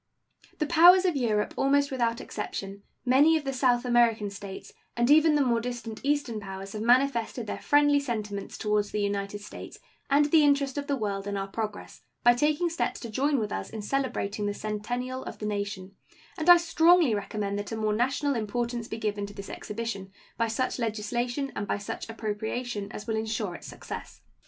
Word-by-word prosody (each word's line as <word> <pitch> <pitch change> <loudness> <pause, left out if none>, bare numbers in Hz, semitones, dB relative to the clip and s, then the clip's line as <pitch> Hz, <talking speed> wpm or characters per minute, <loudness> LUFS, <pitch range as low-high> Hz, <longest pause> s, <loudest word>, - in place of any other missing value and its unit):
The 305 - 0
powers 350 +4 +7
of 355 -4 +2
Europe 220 -6 0
almost 280 +1 +2
without 235 -3 0
exception, 200 -1 -6 0.2
many 285 +6 +5
of 310 - -5
the 270 -1 -3
South 250 -1 +2
American 235 -4 +3
States, 200 -1 -9 0.2
and 240 +3 +3
even 310 0 +6
the 290 -2 +3
more 235 -2 +2
distant 235 -2 -5
Eastern 280 -6 0
powers 195 -1 -7
have 215 - -4
manifested 240 -1 +2
their - - -5
friendly 290 0 +4
sentiments 210 -7 -4
toward 210 -1 +1
the 210 - -4
United 200 0 -2
States 210 - -9 0.3
and 285 +1 +5
the 315 -2 +6
interest 280 -1 +2
of 285 - -6
the 280 - +1
world 200 -4 -3
in 200 0 -2
our 195 0 -3
progress 210 +1 -5 0.2
by 240 - +7
taking 300 +7 +1
steps 335 0 -2
to 235 - -6
join 280 +5 +1
with 215 -4 -2
us 95 - -4
in 215 -2 -6
celebrating 210 -5 -1
the 205 - -2
centennial 245 +5 -4
of - - -7
the 210 - -6
nation, 200 -2 -3 0.4
and 315 +2 0
I 350 - +11
strongly 335 -4 +4
recommend 205 -1 -2
that 205 - -6
a 225 - -3
more 215 -1 0
national 270 +5 +1
importance 235 +1 -2
be 220 - -5
given 205 -2 -2
to 200 - -12
this 200 - -8
exhibition 210 -3 -5 0.2
by 230 - 0
such 255 +3 -1
legislation 240 +5 -2
and 205 - -3
by - - 0
such 205 +2 -6
appropriation 220 0 -4
as 210 - -7
will 220 -1 -1
insure 220 -3 -2
its - - -10
success. - - -8
230 Hz, 190 wpm, -28 LUFS, 210-275 Hz, 0.4 s, I